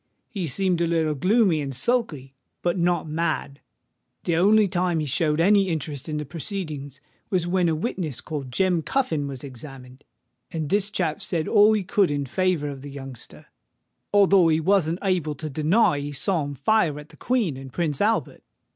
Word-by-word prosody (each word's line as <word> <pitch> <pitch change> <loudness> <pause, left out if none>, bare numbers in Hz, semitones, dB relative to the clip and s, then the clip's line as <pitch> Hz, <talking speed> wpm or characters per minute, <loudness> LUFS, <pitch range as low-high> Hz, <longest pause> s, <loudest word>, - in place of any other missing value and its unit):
He 190 -6 -3
seemed 180 +4 0
a 170 - +2
little 160 -2 +1
gloomy 185 - +2
and 135 -2 -4
sulky—but 150 - -2
not 175 -2 0
mad. 155 -3 -2 0.6
The 170 - 0
only 205 +4 +5
time 175 -2 0
he 155 - -1
showed 150 +2 0
any 195 +2 +4
interest 150 -3 -4
in 155 - -2
the 150 - -4
proceedings, 150 - -6 0.3
was 180 -3 0
when 175 -1 +1
a 160 - +1
witness 165 - -3
called 140 -5 -6
Jem 180 +4 +1
Cuffin 160 - -1
was 135 -3 -7
examined; 130 0 -10 0.5
and 160 -2 -3
this 205 +2 +2
chap 175 -7 -2
said 165 -3 -2
all 210 +1 +5
he 210 -2 0
could 200 0 +2
in 145 -1 -1
favour 180 0 0
of 135 -2 -7
the 145 - -8
youngster, 135 -3 -10 0.7
although 195 -3 +5
he 160 -1 +3
wasn't 170 -1 +2
able 175 -6 0
to 155 +2 -6
deny 155 - +2
that 140 - -5
he 145 - -5
saw 155 +3 -1
him 145 0 -6
fire 155 - +1
at 150 +1 -12
the - - -16
Queen 230 - 0
and 135 0 -9
Prince 155 -4 -2
Albert. 220 +2 0
160 Hz, 180 wpm, -24 LUFS, 145-190 Hz, 0.7 s, only